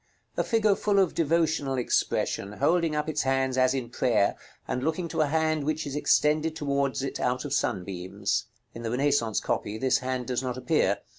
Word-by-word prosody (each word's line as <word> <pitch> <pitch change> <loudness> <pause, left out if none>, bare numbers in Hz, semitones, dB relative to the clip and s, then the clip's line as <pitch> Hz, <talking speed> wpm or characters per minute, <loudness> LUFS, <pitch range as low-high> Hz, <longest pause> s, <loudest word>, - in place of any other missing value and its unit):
A - - +1
figure 215 -3 +2
full 205 0 0
of 190 -4 +3
devotional 155 -4 +1
expression, 105 -4 0
holding 165 - +1
up 150 0 -1
its 155 -1 0
hands 135 -1 +1
as 130 0 +3
in 120 -3 -4
prayer, 115 -5 +2 0.3
and 125 - -2
looking 165 +3 -1
to 155 - 0
a 155 - +3
hand 155 0 +1
which 155 +1 -1
is 140 -1 -5
extended 155 +1 +2
towards 140 -3 -1
it 135 - -4
out 125 +3 -1
of 140 - -3
sunbeams. 95 -3 -2 0.3
In 115 - -8
the 115 - -3
Renaissance 125 -3 +1
copy 105 +1 -2
this 130 +1 +2
hand 130 -1 -3
does 125 0 -1
not 125 -1 -3
appear. 130 - +1
135 Hz, 190 wpm, -27 LUFS, 125-155 Hz, 0.3 s, of